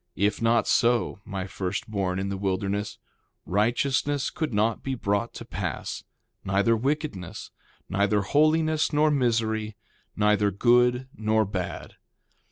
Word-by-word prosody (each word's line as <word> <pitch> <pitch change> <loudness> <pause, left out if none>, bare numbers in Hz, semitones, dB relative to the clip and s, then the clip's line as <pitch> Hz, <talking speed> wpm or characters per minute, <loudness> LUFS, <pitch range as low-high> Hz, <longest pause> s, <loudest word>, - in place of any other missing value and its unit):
If 100 +3 0
not 115 0 +3
so, 120 -4 +2
my 95 -1 -4
first 95 -1 -4
born 95 -4 -1
in 95 +1 -2
the 100 - -3
wilderness, 100 +1 -2 0.5
righteousness 130 +7 +1
could 155 - -3
not 110 +1 +1
be 135 -1 -3
brought 105 0 -1
to - - -8
pass, - - -4 0.4
neither 100 +4 +2
wickedness, 135 - -3 0.4
neither 100 +2 +1
holiness 155 +7 +2
nor 150 0 +3
misery, 110 -5 0 0.4
neither 105 -1 +3
good 125 +4 +3
nor 110 0 +1
bad. 95 -2 -5
110 Hz, 125 wpm, -26 LUFS, 100-125 Hz, 0.5 s, not